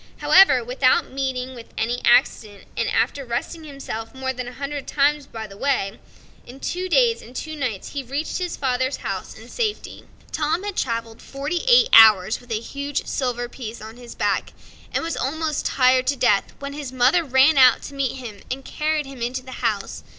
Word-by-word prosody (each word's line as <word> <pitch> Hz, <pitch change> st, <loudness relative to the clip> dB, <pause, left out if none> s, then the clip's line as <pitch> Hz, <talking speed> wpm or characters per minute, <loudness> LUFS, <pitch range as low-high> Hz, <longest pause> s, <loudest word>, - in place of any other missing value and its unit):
Without 255 Hz, +1 st, +2 dB
meeting 260 Hz, -1 st, -3 dB
with 235 Hz, -2 st, -11 dB
any 240 Hz, +2 st, -1 dB
accident, 230 Hz, -4 st, +2 dB
and -, -, -1 dB
after 280 Hz, -, 0 dB
resting 255 Hz, +7 st, -4 dB
himself 270 Hz, -6 st, -7 dB
more 265 Hz, 0 st, -3 dB
than 255 Hz, -1 st, -6 dB
a 245 Hz, -, -8 dB
hundred 280 Hz, +2 st, -5 dB
times 290 Hz, 0 st, +1 dB
by 220 Hz, -1 st, -7 dB
the 200 Hz, -2 st, -12 dB
way, 255 Hz, -7 st, -1 dB, 0.4 s
in 255 Hz, +3 st, -13 dB
two 365 Hz, +5 st, -3 dB
days 470 Hz, +3 st, +3 dB
and 245 Hz, +3 st, -14 dB
two 315 Hz, +4 st, -5 dB
nights 250 Hz, -9 st, -4 dB
he 285 Hz, -, -4 dB
reached 280 Hz, +7 st, -4 dB
his 360 Hz, -2 st, -3 dB
father's 260 Hz, 0 st, 0 dB
house -, -, -5 dB
in -, -, -13 dB
safety. 435 Hz, -3 st, -4 dB, 0.2 s
Tom 310 Hz, +4 st, -1 dB
had 410 Hz, -2 st, -4 dB
traveled 230 Hz, -2 st, -3 dB
forty 285 Hz, +5 st, -4 dB
eight 485 Hz, -1 st, +6 dB
hours 215 Hz, -2 st, +7 dB
with 245 Hz, -, -19 dB
a 220 Hz, -2 st, -1 dB
huge 280 Hz, +4 st, -4 dB
silver 245 Hz, -3 st, -2 dB
piece 235 Hz, -2 st, -8 dB
on 220 Hz, +2 st, -10 dB
his 245 Hz, -1 st, -11 dB
back, -, -, -1 dB, 0.4 s
and -, -, -1 dB
was 330 Hz, 0 st, -3 dB
almost 305 Hz, +3 st, -2 dB
tired 255 Hz, 0 st, +3 dB
to 280 Hz, -, +2 dB
death, 205 Hz, -6 st, +3 dB
when 280 Hz, 0 st, -7 dB
his 285 Hz, -3 st, -6 dB
mother 260 Hz, +7 st, +3 dB
ran 270 Hz, +2 st, +4 dB
out 255 Hz, -2 st, +6 dB
to -, -, -8 dB
meet 275 Hz, -3 st, -1 dB
him 230 Hz, -6 st, -9 dB
and 265 Hz, +1 st, -5 dB
carried 305 Hz, -1 st, -1 dB
him 270 Hz, -3 st, -10 dB
into 250 Hz, +2 st, -3 dB
the 260 Hz, -, -11 dB
house. 215 Hz, -5 st, -2 dB
260 Hz, 190 wpm, -22 LUFS, 240-290 Hz, 0.4 s, hours